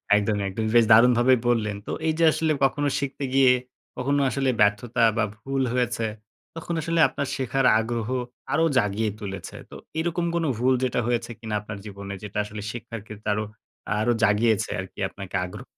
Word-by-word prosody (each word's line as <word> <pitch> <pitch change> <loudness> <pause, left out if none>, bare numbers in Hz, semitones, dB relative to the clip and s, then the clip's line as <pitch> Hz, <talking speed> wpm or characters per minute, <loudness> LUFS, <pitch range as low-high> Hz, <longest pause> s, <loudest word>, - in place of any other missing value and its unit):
একদমই, 105 0 +1
একদম 110 +3 -3
বেশ 120 -1 +7
দারুণভাবেই 120 +2 +6
বললেন। 105 -4 0
তো - - -3 0.2
এই 160 - +2
যে, - - +3
আসলে 160 0 0
কখনো 145 +2 +2
শিখতে 140 0 -4
গিয়ে 135 -1 +6 0.5
কখনো 140 +3 +1
আসলে 135 +2 0
ব্যর্থতা 110 +4 +2 0.2
বা 115 - +3
ভুল 135 +5 -3
হয়েছে, 120 -2 0 0.5
তখন 165 +1 -5
আসলে 165 +2 -1
আপনার 140 - -4
শেখার 135 0 0
আগ্রহ 115 0 -3 0.4
আরও 165 - +3
জাগিয়ে 105 -1 +1
তুলেছে। 95 -3 -7
তো - - -11 0.2
এরকম 170 +1 -1
কোন 170 - 0
ভুল 125 +3 +3
যেটা 125 -1 0
হয়েছে 120 0 -1
কিনা 110 -2 -4
আপনার 105 0 -7
জীবনে 100 -1 -7
যেটা, 105 -1 -6
আসলে 105 0 -7
শিক্ষার 115 -1 -7
ক্ষেত্রে 105 0 -7
আরো, 105 +1 -1 0.6
আরো 120 +3 +2
জাগিয়েছে 110 0 +2
আর 95 - -3
কি - - -15
আপনাকে 95 -1 -8
আগ্রহ? 90 - -9
115 Hz, 175 wpm, -25 LUFS, 105-135 Hz, 0.6 s, বেশ